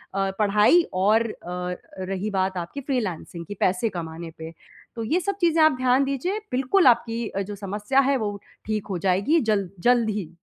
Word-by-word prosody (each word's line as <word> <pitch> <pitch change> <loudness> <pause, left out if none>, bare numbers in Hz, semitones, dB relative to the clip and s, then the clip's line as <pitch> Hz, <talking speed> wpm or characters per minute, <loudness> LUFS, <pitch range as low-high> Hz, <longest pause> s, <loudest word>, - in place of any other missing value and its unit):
अ, 195 0 0
पढ़ाई 210 - +5
और 205 +5 +3
अ, 180 -1 -5 0.3
रही 195 +2 -2
बात 190 -1 0
आपकी 175 +11 -5
फ़्रीलांसिंग 190 - -3
की, 205 - -6
पैसे 185 +5 +1
कमाने 165 -2 -6
पे। 160 0 -8 0.4
तो 230 - -2
ये 310 +11 +1
सब 395 +2 -2
चीज़ें 330 -2 +3
आप 310 - +6
ध्यान 255 +1 +3
दीजिए, 275 +10 -2
बिल्कुल 265 +7 +3
आपकी 235 -1 +2
अ, 195 - -3
जो 205 +1 -5
समस्या 205 +6 -1
है, 275 - +3
वो 205 -4 -3 0.3
ठीक 215 -1 -2
हो 185 - -1
जाएगी 200 - +3
जल 200 -3 0 0.2
जल्द 240 -2 +4
ही। 205 -6 -3
210 Hz, 185 wpm, -24 LUFS, 190-255 Hz, 0.4 s, आप